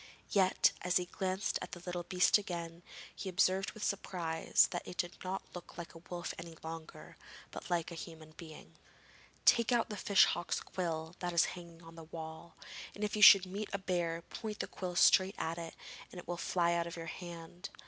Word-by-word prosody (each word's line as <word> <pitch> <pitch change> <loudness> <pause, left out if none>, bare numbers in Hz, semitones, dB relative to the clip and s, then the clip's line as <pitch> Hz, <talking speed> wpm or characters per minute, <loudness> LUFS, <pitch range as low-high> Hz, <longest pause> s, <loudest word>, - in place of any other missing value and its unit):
Yet, 190 -2 +4
as 180 0 +2
he 180 - 0
glanced 190 +2 -2
at - - -7
the 175 - -8
little 180 -1 -3
beast 180 +3 +4
again, 170 -3 -5 0.3
he 195 - -5
observed 190 +1 +2
with 215 - -8
surprise 170 -5 +2
that 175 - -2
it 180 - -8
did 175 0 -2
not 185 +1 -3
look 180 -1 -10
like 170 -1 -7
a 165 - -11
wolf 175 -1 -4
any 165 -1 -9
longer, 160 0 -8 0.3
but - - -8
like 175 -1 0
a 165 - -6
human 160 -2 -10
being. 155 -1 -12 0.7
'Take 235 0 +5
out 240 -2 +2
the 210 - -5
fish 200 +1 +5
hawk's 175 0 -1
quill 165 -2 -4
that 175 -1 -2
is 170 - +5
hanging 170 -2 -11
on 165 0 -12
the 165 -1 -10
wall, 160 +1 -8 0.4
and 205 - -5
if 210 - -1
you 210 - -1
should 195 -2 +10
meet 200 +3 -5
a - - +1
bear 175 -3 -1
point 215 +1 -6
the - - -1
quill 180 -2 -5
straight 190 +2 +5
at 165 +1 -2
it, 165 -1 -7 0.4
and - - -10
it 175 - -9
will 175 - -2
fly 170 0 +1
out 170 0 0
of 170 - -6
your 165 -1 -6
hand. 175 +1 -8
175 Hz, 205 wpm, -34 LUFS, 165-190 Hz, 0.7 s, should